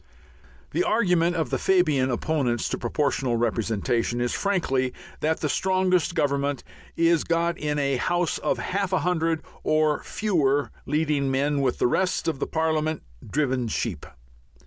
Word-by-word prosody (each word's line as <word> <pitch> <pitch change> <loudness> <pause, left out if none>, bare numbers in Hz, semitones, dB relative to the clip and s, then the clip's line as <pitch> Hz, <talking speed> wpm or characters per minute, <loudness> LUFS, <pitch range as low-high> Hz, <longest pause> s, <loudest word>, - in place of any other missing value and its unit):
The 360 - +1
argument 180 - +2
of 160 -7 -1
the - - 0
Fabian 155 -9 +2
opponents 125 -1 0
to - - -2
Proportional 130 -1 0
Representation 115 +1 0
is 120 -1 0
frankly 135 -10 0 0.3
that 160 +1 0
the 155 - +1
strongest 185 0 +1
Government 140 -3 0 0.3
is 165 0 +3
got 170 0 0
in 150 -2 -2
a 140 -2 +1
House 175 +6 0
of - - 0
half 195 0 -2
a 185 - +2
hundred 165 -1 0 0.2
or 155 -1 +2
fewer 145 - 0 0.2
leading 150 -2 +1
men, 140 +2 +1
with 130 -3 0
the - - +1
rest 180 +10 +1
of 155 -5 -1
the - - -2
Parliament 160 -1 0 0.3
driven 130 -2 0
sheep. 105 -7 -3
150 Hz, 145 wpm, -25 LUFS, 130-170 Hz, 0.3 s, is